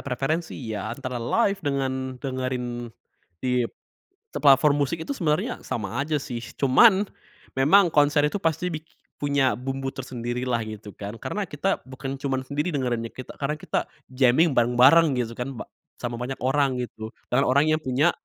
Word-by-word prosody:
preferensi 140 +5 -2
ya, 110 -5 -4
antara 125 +1 -5
live 200 - +1
dengan 130 -2 -2
dengerin 125 -2 -3 0.5
di 125 -1 +1 0.7
se - - -4
platform 140 0 +6
musik 140 +4 -1
itu 280 - -2
sebenernya 155 - -1
sama 115 +3 -3
aja 150 +1 0
sih. 125 -4 -6 0.2
Cuman, 190 - +6 0.5
memang 155 +9 +5
konser 145 0 +4
itu 195 +7 -3
pasti 165 +2 0
biki 155 +1 -7 0.3
punya 140 -2 +2
bumbu 135 +1 -4
tersendirilah 125 -1 -3
gitu 110 -1 -8
kan, 100 +1 -6
karena 210 -1 -3
kita 195 +1 -1
bukan 135 +1 -6
cuman 135 -1 -1
sendiri 145 +6 -2
dengerinnya 120 -5 -2
kita 130 - -9
karena 140 +1 -1
kita 155 - -2 0.3
jamming 130 +5 +4
bareng-bareng 130 +7 +6
gitu 120 -3 -2
kan 125 +2 -4
ba - - -7 0.3
sama 120 -1 -3
banyak 125 +2 -5
orang 135 +1 +2
gitu. 110 -2 -6 0.2
Dengan 130 +3 +3
orang 140 +4 +3
yang 155 - +4
punya 145 +3 +2
135 Hz, 160 wpm, -25 LUFS, 125-150 Hz, 0.7 s, platform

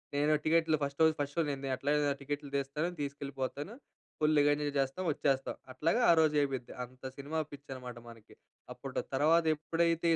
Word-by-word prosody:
నేను 150 +2 +3
టికెట్లు 160 0 +3
ఫస్ట్ 140 +1 -3
రోజు, 160 - +6
ఫస్ట్ 145 0 -2
షో - - +4
నేను 135 0 -4
ఎట్లా 140 +3 -3
అయినా 145 -1 +2
టికెట్లు 145 0 -4
తీస్తాను, 140 +5 -1
తీసుకెళ్ళిపోతాను, 140 - -4 0.5
ఫుల్‌గా 150 -1 +4
ఎంజాయ్ 145 0 -1
జేస్తాం, 135 +7 0
వచ్చేస్తాం. 135 -2 0 0.2
అట్లాగా 165 - +1
ఆ - - +9
రోజు 155 -1 +4
అయిపోద్ది. 135 -4 -2
అంత 125 +1 -12 0.2
సినిమా 150 +3 -3
పిచ్చి 145 0 -11
అనమాట, 125 -2 -8
మనకి 115 -2 -15 0.4
అప్పుడు. - - -5 0.2
తర్వాత 160 +4 +4
ఎప్పుడైతే 165 +2 +1
145 Hz, 165 wpm, -32 LUFS, 135-155 Hz, 0.5 s, ఆ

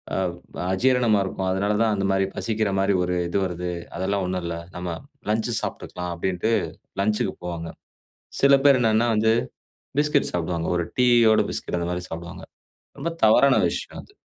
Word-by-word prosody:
அவ் 95 -2 0 0.4
அஜீரணமா 120 0 +3
இருக்கும், 95 0 -3
அதனால 100 +2 0
தான் 110 -2 +2
அந்த 100 - -1
மாரி 95 0 +2
பசிக்கிற 110 -2 -1
மாரி 100 +1 +2
ஒரு 90 0 -1
இது 100 - 0
வருது. 90 0 -3 0.3
அதெல்லாம் 95 0 -1
ஒண்ணும் 90 -1 -2
இல்லை, 85 0 -3 0.2
நம்ம 90 0 -4 0.4
லஞ்ச் 110 +2 0
சாப்ட்டுக்கலாம்" 90 -1 -5
அப்படின்ட்டு 95 +5 -1 0.5
லஞ்ச்க்கு 105 -1 0
போவாங்க. 85 -1 -5 0.7
சில 140 0 +7
பேர் 135 -3 +6
என்னான்னா 110 +1 +3
வந்து 110 +1 +3 0.7
பிஸ்கட் 150 -1 +2
சாப்டுவாங்க. 85 -1 -2
ஒரு 85 - -1
டீயோட 120 -3 +5
பிஸ்கட் 85 - -3
அந்த 85 - -2
மாரி 90 0 -3
சாப்டுவாங்க 85 +2 -7 0.6
ரொம்ப 165 +4 -2 0.2
தவறான 135 +5 +6
விஷயம் - - -6
அது. - - -21
95 Hz, 155 wpm, -24 LUFS, 90-110 Hz, 0.7 s, சில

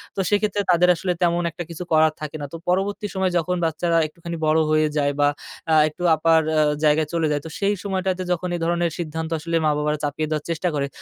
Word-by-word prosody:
তো - - -4
সেক্ষেত্রে 205 -1 +1
তাদের 180 +1 +4
আসলে 180 +2 -2
তেমন 175 0 +2
একটা 175 - -6
কিছু 170 +1 -6
করার 155 0 +4
থাকে 155 0 -5
না। - - -3
তো 165 - -4
পরবর্তী 195 +3 0
সময় 190 -1 +1
যখন 175 +2 0
বাচ্চারা 165 +1 0
একটুখানি 170 +2 -7
বড় 155 +1 +3
হয়ে 155 0 +3
যায়, 145 0 +1
বা 145 - +5 0.4
আ - - +6
একটু 165 +4 -9
আপার 160 +1 +3 0.4
জায়গায় 155 0 +3
চলে 165 -2 +1
যায় 145 -1 0
তো 160 - -6
সেই 200 +1 +1
সময়টাতে 190 -2 -1
যখন 180 +1 -1
এই - - -3
ধরনের 170 0 0
সিদ্ধান্ত 160 0 -4
আসলে 165 +2 -3
মা 155 - +4
বাবারা 150 0 0
চাপিয়ে 150 +1 -2
দেওয়ার 155 -1 -2
চেষ্টা 165 +2 -1
করে। 140 -1 -1
165 Hz, 220 wpm, -22 LUFS, 155-180 Hz, 0.4 s, আ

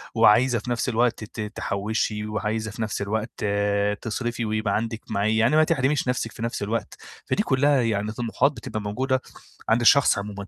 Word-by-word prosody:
وعايزة 120 +4 +5
في 125 - -6
نفس 120 +2 0
الوقت 120 -1 +1
ت 110 +1 -7
تحوّشي 105 +1 -2
وعايزة 105 +1 -2
في 110 - -7
نفس 105 -2 -2
الوقت 110 +2 -3 0.6
تصرفي 120 0 -3
ويبقى 110 -1 0
عندِك 115 0 -2
معي 110 +1 +1
يعني 115 +6 +3
ما 155 - +6
تحرميش 135 -2 +1
نَفْسِك 120 -3 -1
في - - -11
نفس 115 -3 -2
الوقت، 110 +3 -3 0.3
فدي 210 - 0
كُلّها 140 - +3
يعني 110 -2 -1
طموحات 120 +5 +1
بتبقى 110 -6 -6
موجودة 130 +6 -1 0.5
عند 115 +2 +3
الشخص 135 +1 +5
عمومًا 100 -1 -6
115 Hz, 170 wpm, -24 LUFS, 105-125 Hz, 0.6 s, ما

